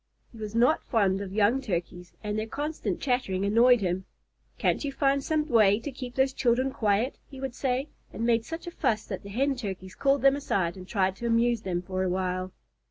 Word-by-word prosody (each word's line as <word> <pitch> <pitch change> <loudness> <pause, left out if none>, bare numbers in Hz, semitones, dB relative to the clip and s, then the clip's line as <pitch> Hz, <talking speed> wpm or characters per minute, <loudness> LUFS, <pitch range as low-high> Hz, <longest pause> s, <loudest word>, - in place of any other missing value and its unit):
He 230 - -13
was 215 0 -6
not 245 +7 +3
fond 200 -4 +2
of 195 -2 -6
young 215 +6 +2
Turkeys, 180 -5 -4
and 210 0 -2
their 215 - -3
constant 290 - -3
chattering 245 -8 0
annoyed 235 +3 +5
him. 185 0 -1 0.5
"Can't - - +1
you 285 - -2
find 275 0 +1
some 310 0 0
way 215 -5 +5
to 260 +5 -5
keep 250 -2 -8
those 265 0 +2
children 255 +1 +1
quiet?" 220 +2 0
he 270 - -10
would 265 -2 -4
say, 260 +2 -1 0.2
and 225 +4 -3
made 230 -1 +3
such 325 +6 -7
a 345 - -5
fuss 215 -9 0
that - - -5
the 200 - -10
Hen 270 +7 +1
Turkeys 190 -6 -6
called 275 -1 +1
them 275 0 +6
aside 190 -11 -1
and 185 -1 -10
tried 190 -3 +1
to 235 - -3
amuse 230 0 +2
them 180 -3 -2
for 185 0 -3
a 190 - +1
while. 185 0 -2
230 Hz, 215 wpm, -28 LUFS, 195-265 Hz, 0.5 s, them